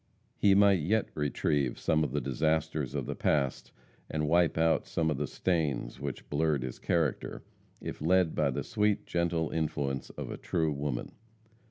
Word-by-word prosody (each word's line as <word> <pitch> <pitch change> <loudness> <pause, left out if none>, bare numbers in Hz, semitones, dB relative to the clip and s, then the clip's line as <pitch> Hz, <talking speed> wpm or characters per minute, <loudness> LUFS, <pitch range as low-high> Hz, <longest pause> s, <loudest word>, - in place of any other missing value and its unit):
He 100 -1 +4
might 100 -2 +6
yet 105 +8 +1
retrieve 75 -3 0
some 80 0 +2
of 70 - -2
the 75 - -1
disasters 75 +1 0
of - - -1
the - - -3
past, 70 -4 0 0.4
and 75 -1 -1
wipe 85 +1 +3
out 80 -2 +2
some 80 -1 0
of 75 - -1
the 75 - -1
stains 80 -9 -1
which 70 -2 -5
blurred 75 -2 +1
his 65 -1 -6
character, 80 -6 -1 0.4
if - - -6
led 90 +1 +3
by - - +2
the - - -2
sweet, 105 -1 +1
gentle 85 -2 0
influence 70 -4 -2
of - - -6
a - - -5
true 80 -3 0
woman. 70 -4 -3
80 Hz, 170 wpm, -30 LUFS, 70-85 Hz, 0.4 s, might